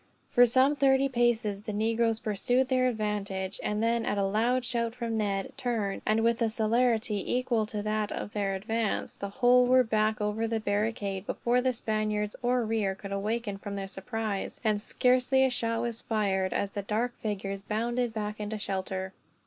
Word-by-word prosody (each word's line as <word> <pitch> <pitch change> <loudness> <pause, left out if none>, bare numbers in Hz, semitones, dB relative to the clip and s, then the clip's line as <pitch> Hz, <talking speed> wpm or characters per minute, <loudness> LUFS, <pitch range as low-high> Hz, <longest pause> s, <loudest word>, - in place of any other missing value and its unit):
For 245 0 +6
some 260 +5 +4
thirty 275 -1 +4
paces, 240 -5 +1
the 210 0 -5
negroes 225 +1 +1
pursued 245 +4 0
their 255 -1 +3
advantage; 205 -4 -2
and 210 +1 -1
then 230 0 +2
at 205 - -1
a 200 - +2
loud 235 +5 +1
shout 235 -1 -1
from 235 -2 -3
Ned 200 -3 -1
turned, 220 -6 -2
and 220 +1 +3
with 230 0 +2
a 230 - +3
celerity 220 -1 +1
equal 240 -4 +1
to 210 -1 -4
that 215 0 -1
of 205 - -5
their 200 -2 -1
advance, 220 +2 -2
the 200 - -5
whole 245 +3 +4
were 255 0 +6
back 215 -1 +1
over 210 +2 -1
the 225 0 -1
barricade, 205 -2 -2
before 245 +1 +1
the 255 0 +2
Spaniards 215 -3 -1
in 240 - +1
rear 225 -5 +1
could 195 +1 -9
awaken 205 +1 -2
from 200 0 -6
their 195 -1 -4
surprise; 210 +1 -4
and 215 -2 +1
scarcely 255 +3 +3
a 260 - +1
shot 230 -1 -1
was 235 -1 -2
fired, 195 -4 0
as 200 - -1
the 200 - -3
dark 220 +5 -1
figures 195 -2 -3
bounded 235 +4 -1
back 210 -1 -4
into 210 +1 -3
shelter. 190 -1 -3
220 Hz, 180 wpm, -29 LUFS, 205-240 Hz, -, For